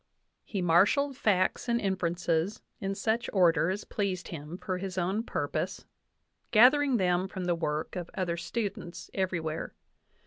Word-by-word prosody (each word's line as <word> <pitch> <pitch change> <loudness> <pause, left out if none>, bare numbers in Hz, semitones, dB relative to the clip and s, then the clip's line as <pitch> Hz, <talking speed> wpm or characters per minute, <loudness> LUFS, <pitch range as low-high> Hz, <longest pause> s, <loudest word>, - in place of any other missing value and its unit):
He 195 -4 -3
marshalled 205 - +4
facts 200 +1 +1
and 235 0 +2
inferences 175 -1 -1 0.2
in 195 0 -2
such 225 +3 0
order 170 -4 +4
as 195 +3 -2
pleased 190 -4 -3
him 155 +1 -7
for 185 -1 -3
his 190 -1 -5
own 185 +4 0
purpose, 230 - -3 0.6
gathering 260 +4 +6
them 180 -1 +2
from 190 -1 -5
the 175 - +2
work 155 -1 -2
of 175 -2 -4
other 180 -3 -1
students 185 -3 -4
everywhere. 170 -5 -2
185 Hz, 140 wpm, -29 LUFS, 175-205 Hz, 0.6 s, gathering